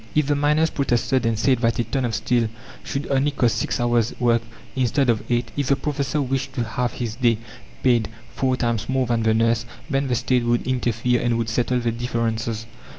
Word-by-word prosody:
If 150 -1 +3
the 145 +1 +1
miners 150 +2 +2
protested 125 -2 +1
and 115 -1 +1
said 130 +2 +2
that 115 -1 +1
a 120 - +2
ton 130 +1 -1
of 115 -3 -1
steel 115 +2 +1 0.3
should 140 - -3
only 135 +2 +3
cost 125 -5 +1
six - - -1
hours' 120 -1 +1
work 115 -1 +3 0.3
instead 130 0 +2
of 110 - -1
eight; 120 0 0
if 140 -2 -1
the 140 - +4
professor 145 +1 -2
wished 135 -1 -1
to 120 - -1
have 120 +2 -2
his 120 -3 -3
day 120 -3 +3 0.5
paid 120 -4 +3 0.2
four 130 -1 0
times 115 -3 -1
more 130 -1 +1
than 120 -1 0
the 110 0 +2
nurse, 115 0 +2 0.3
then 135 0 +1
the 125 - +1
State 125 +1 +1
would 120 0 +1
interfere 125 -1 0
and 120 -1 +1
would 115 -1 -1
settle 125 +2 +1
their 120 -1 0
differences. 115 -1 -2
120 Hz, 210 wpm, -23 LUFS, 115-135 Hz, 0.5 s, the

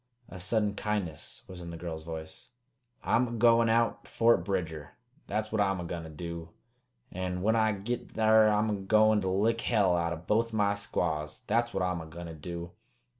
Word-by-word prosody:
A 95 - -9
sudden 105 +2 +1
kindness 100 -7 -4
was 90 -1 -9
in 85 - -7
the 85 - -7
girl's 80 -2 -5
voice. 80 0 -8 0.6
"I'm 125 +2 +2
a - - -6
goin' 115 0 +4
out 115 +1 +1
to - - -16
Fort 115 +1 +3
Bridger, 85 -6 -3 0.3
that's 110 +1 -2
what 110 -1 +1
I'm 95 -2 +1
a - - -4
goin' 85 0 -4
to 80 - -9
do; 85 +1 -7 0.6
an' 90 0 -3
when 110 +2 +3
I 110 -1 +3
git 110 +5 -4
thar 110 0 +5
I'm 105 +1 +2
a 100 -2 -2
goin' 110 +1 +4
to 95 - -1
lick 110 +5 +1
hell 100 -6 +3
out 85 -1 0
o' - - -5
both 110 +7 0
my 100 -2 +2
squaws, 80 -7 -2
that's 120 +2 +1
what 95 - -1
I'm 90 -2 -1
a 80 - -9
goin' 85 +2 -8
to 85 - -7
do! 85 +2 -7
95 Hz, 205 wpm, -30 LUFS, 85-110 Hz, 0.6 s, thar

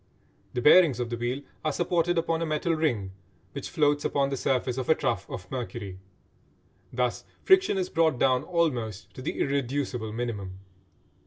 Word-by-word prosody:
The 125 - -1
bearings 150 -6 +6
of 120 -1 -3
the - - 0
wheel 120 +4 -3 0.2
are 155 - +1
supported 175 +1 +1
upon 165 0 0
a - - 0
metal 155 +2 0
ring 120 -12 0 0.4
which - - -6
floats 145 -1 +2
upon 140 -1 +1
the - - 0
surface 130 -1 0
of 130 - -4
a 160 - +6
trough - - -2
of 90 0 -8
mercury. 115 -7 -5 0.9
Thus 125 0 -1 0.2
friction 380 - +4
is 185 -1 0
brought 160 -4 +2
down 130 0 +3
almost 130 - -1
to - - -9
the 135 - -4
irreducible 135 -4 -1
minimum. 105 -5 -4
135 Hz, 165 wpm, -27 LUFS, 120-160 Hz, 0.9 s, bearings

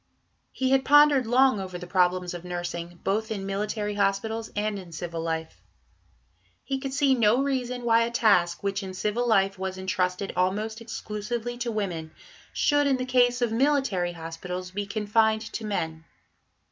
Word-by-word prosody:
He 260 0 -1
had 270 0 +4
pondered 290 -3 +6
long 255 -1 +4
over 185 -2 -5
the 180 - -8
problems 180 0 +1
of 175 -1 -7
nursing, 175 -1 -5
both 215 +3 0
in 200 -3 -4
military 210 +1 -2
hospitals 205 +3 -1
and 210 -1 -1
in 180 -3 -11
civil 170 0 -4
life. 160 -1 -4 1.0
He 270 -1 -2
could 270 0 -4
see 275 0 +3
no 235 +1 +3
reason 250 -3 -2
why 230 -1 +4
a 230 - +1
task, 200 -8 +2
which 200 0 -1
in 190 -1 -7
civil 215 +5 -1
life 195 -3 +2
was 190 0 -3
entrusted 185 0 -1
almost 210 +5 -1
exclusively 225 +1 -4
to 240 -1 -2
women, 180 -7 -3 0.4
should 290 -1 +2
in 270 -2 +2
the 255 - -3
case 245 -1 +3
of 235 - +1
military 230 -9 +1
hospitals 180 +2 -6
be 200 +1 -4
confined 220 +1 +2
to 220 - -4
men. 160 -6 -3
210 Hz, 165 wpm, -26 LUFS, 185-240 Hz, 1.0 s, pondered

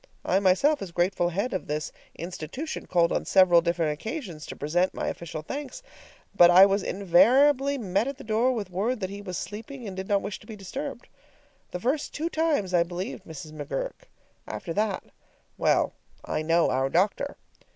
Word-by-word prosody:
I 190 - +3
myself, 200 +11 +3
as 190 -3 -6
grateful 175 0 +1
head 200 +8 -2
of 185 - -3
this 150 0 -3 0.2
institution, 175 - -6
called 170 -2 +3
on - - 0
several 185 -3 +5
different 165 -2 0
occasions 180 - -6
to - - -7
present 175 +6 0
my - - -2
official 155 -2 -6
thanks, 295 - -6 0.5
but 175 -3 +7
I 185 +2 +9
was 200 +1 +1
invariably 260 +11 +4
met 205 0 0
at 275 -1 -4
the - - -10
door 225 +4 +2
with 210 -7 -4
word 215 +7 -1
that 190 0 -3
he 200 0 -7
was 185 -3 -5
sleeping 230 +4 -7
and 190 - -6
did 190 0 -5
not 200 -1 +1
wish 200 - -5
to 210 - -18
be 220 - -7
disturbed. 240 +6 -6 0.6
The 180 - -5
first 270 - -1
two 330 +3 -2
times 300 - 0
I 175 - +5
believed 180 +3 -4
Mrs. 155 -1 -9
McGurk; - - -5 0.4
after 165 - -5
that 210 0 0 0.5
well, - - +2 0.3
I - - -2
know 165 +2 +3
our 130 +1 +1
doctor! 200 - 0
195 Hz, 180 wpm, -27 LUFS, 175-250 Hz, 0.6 s, I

